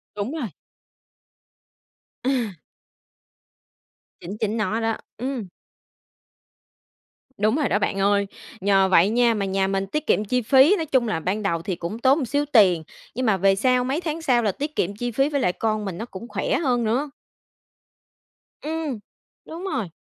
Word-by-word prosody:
Đúng 210 +7 -3
rồi. 290 -9 -3 1.8
À. 250 -6 0 1.7
Chính 195 +5 -7
chính 220 +1 0
nó 220 +1 -1
đó, 225 -1 0 0.2
ừm. 250 -3 -4 1.9
Đúng 215 +6 +2
rồi 300 - +1
đó 205 - +2
bạn 195 -1 -1
ơi. 200 0 +2 0.3
Nhờ 195 0 +3
vậy 185 +1 +5
nha, 235 0 +3
mà 200 -2 -1
nhà 190 0 +1
mình 195 0 -1
tiết 305 +9 -3
kiệm 210 - +2
chi 250 +4 0
phí, 270 - +6
nói 325 -4 -3
chung 255 -5 +1
là 165 -5 -1
ban 195 +6 -2
đầu 170 -5 -1
thì 185 -2 -3
cũng 175 +7 -5
tốn 265 +4 +4
một 275 - -1
xíu 285 +5 0
tiền, 185 - +5 0.3
nhưng 255 +2 -1
mà 215 -3 +3
về 195 +1 +3
sau, 250 +4 +2
mấy 275 +5 -1
tháng 325 -1 -4
sau 245 -5 +3
là 210 -3 +1
tiết 295 +8 -5
kiệm 200 +3 -1
chi 245 +2 -3
phí 270 +5 +1
với 285 -2 -1
lại 180 - +2
con 215 +1 -1
mình 190 -2 -5
nó 225 - -4
cũng 230 +2 -9
khỏe - - -1
hơn 250 -7 +1
nữa. 260 +7 0 1.5
Ừm, 310 -6 -3 0.5
đúng 335 +3 -8
rồi. 225 - -2
225 Hz, 175 wpm, -23 LUFS, 200-270 Hz, 1.9 s, phí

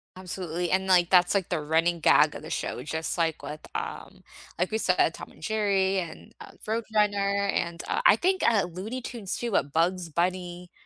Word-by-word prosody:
Absolutely, 180 -2 -4
and, 190 +1 +1
like, 180 -2 +4
that's, 180 +1 +4
like, 195 -3 0
the 175 -4 -1
running 165 +3 +1
gag - - +4
of - - -8
the - - -9
show, 125 - -3
just 160 +2 -3
like 165 -2 0
with, 150 +1 -7
um - - -6 0.4
like 180 +4 0
we 220 - 0
said, 180 -5 +2
Tom - - -9
and - - -20
Jerry 195 -2 +1
and, 165 -3 -9
uh, - - -10 0.2
Roadrunner 205 -3 +1
and, 170 -2 -2
uh, - - 0
I 205 - +7
think, 375 +7 +1
uh, 215 -4 +3
Looney 190 +9 -6
Tunes 230 -6 -5
too, 240 - -3
but 145 -7 0
Bugs 170 +1 0
Bunny, 175 +1 -2
185 Hz, 195 wpm, -27 LUFS, 170-200 Hz, 0.4 s, I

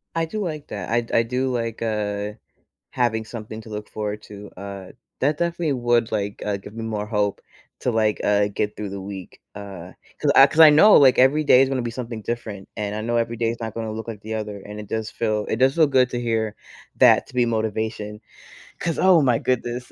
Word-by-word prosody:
I 165 - +1
do 215 +7 -5
like 155 -5 -5
that, - - -6
I 120 +1 +1
I 115 - +4
do 125 +3 -1
like, 115 -2 -3
uh, 105 -2 -2 0.6
having 110 -3 0
something 110 -1 -8
to 110 - -13
look 105 0 -6
forward 105 0 -4
to, 105 0 -11
uh, 100 -1 -8 0.3
that 145 +3 +1
definitely 170 -3 0
would, 120 -2 +1
like, 100 -2 -3
uh, 105 -1 -1
give 100 +1 -12
me 115 - -5
more 105 -2 -3
hope 105 -2 -1 0.4
to, 125 - 0
like, 110 -2 +1
uh, 105 0 +3
get 105 +1 -2
through 105 -1 -5
the 100 0 -6
week, 95 -1 -9 0.2
uh, 95 -3 -9 0.3
'cause - - +2
I 135 - +10
'cause 155 +3 -3
I 160 -1 +11
know, 180 +8 +7
like, 135 -3 +6
every 140 +4 +4
day 125 - +7
is 135 - +3
gonna 135 -2 -1
be 120 -1 -3
something 115 -2 -6
different, 105 -4 -5
and 105 -1 -3
I 105 - -3
know 120 +2 -1
every 115 0 -1
day 115 0 0
is 115 - -6
not 110 -2 -4
gonna 110 -1 -4
look 110 +1 -6
like 110 -3 -7
the 110 +1 -6
other, 105 -2 -4
and 105 +2 -9
it 105 - -11
does 110 -1 -2
feel 110 -3 -1
it - - +1
does 130 +4 +3
feel 160 -2 +5
good 130 -2 +3
to 120 - -3
hear 110 -3 -1 0.4
that - - +5
to - - -16
be 125 -1 +2
motivation. 110 -2 -2 0.6
'Cause, 165 - -2
oh 185 -3 +6
my 125 -4 +3
goodness, 120 0 -2
110 Hz, 230 wpm, -23 LUFS, 105-125 Hz, 0.6 s, I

